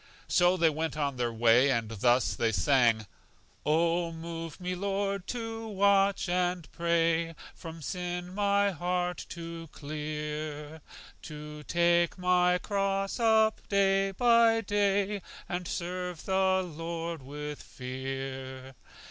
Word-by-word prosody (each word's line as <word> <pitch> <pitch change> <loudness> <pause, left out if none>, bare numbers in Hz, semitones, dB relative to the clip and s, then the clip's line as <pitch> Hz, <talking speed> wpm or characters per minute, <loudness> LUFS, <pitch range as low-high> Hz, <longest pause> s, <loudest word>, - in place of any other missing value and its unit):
So 180 +1 +4
they 165 -2 +4
went 160 0 -3
on 140 -3 -1
their 120 -1 0
way, 120 +4 +4
and 115 -4 +1
thus 120 +2 +2
they 115 - +1
sang: 115 -3 +3 0.6
"O 170 +2 +2
move 165 0 -7
me, 180 0 -3
Lord, 200 0 -2
to 225 -2 -4
watch 200 -1 +3
and 180 -2 0
pray, 165 -1 +1 0.2
From 165 -2 -9
sin 180 +2 -4
my 200 0 +2
heart 180 +1 -2
to 165 -2 -7
clear; 150 0 -5 0.4
To 150 0 -8
take 170 +2 +2
my 180 0 +3
cross 195 +2 -1
up 220 -1 +3
day 195 -1 +3
by 230 +2 +4
day, 205 0 +1 0.3
And 180 0 -3
serve 180 -1 -4
the 190 -1 +2
Lord 165 -1 -5
with 150 +2 -6
fear." 130 0 -6
170 Hz, 120 wpm, -29 LUFS, 150-195 Hz, 0.6 s, So